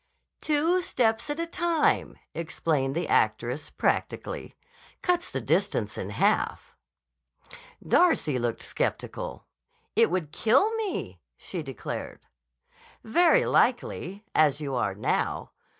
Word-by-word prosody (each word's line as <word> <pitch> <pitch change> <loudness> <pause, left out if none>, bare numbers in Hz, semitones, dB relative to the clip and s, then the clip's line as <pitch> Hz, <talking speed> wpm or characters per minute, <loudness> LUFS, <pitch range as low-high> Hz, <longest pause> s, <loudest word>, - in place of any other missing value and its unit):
"Two 315 +4 +2
steps 230 -6 0
at 295 +2 -2
a 335 - 0
time," 335 -1 +1 0.2
explained 155 -4 -1
the 170 - -1
actress 120 +6 +1
practically, - - -2 0.5
"cuts 355 -1 +1
the - - -3
distance - - 0
in - - -4
half." - - 0 1.1
Darcy 160 - +3
looked 120 -1 -2
skeptical. - - -3 0.5
"It - - +5
would 170 -4 -2
kill 275 - +3
me," 380 - -3 0.2
she 180 - -5
declared. 135 -7 -6 0.8
"Very 330 +9 +4
likely, 210 -5 +1
as 150 -2 +4
you 140 -3 -4
are 105 -6 0
now. 105 - -1
185 Hz, 110 wpm, -27 LUFS, -, 1.1 s, It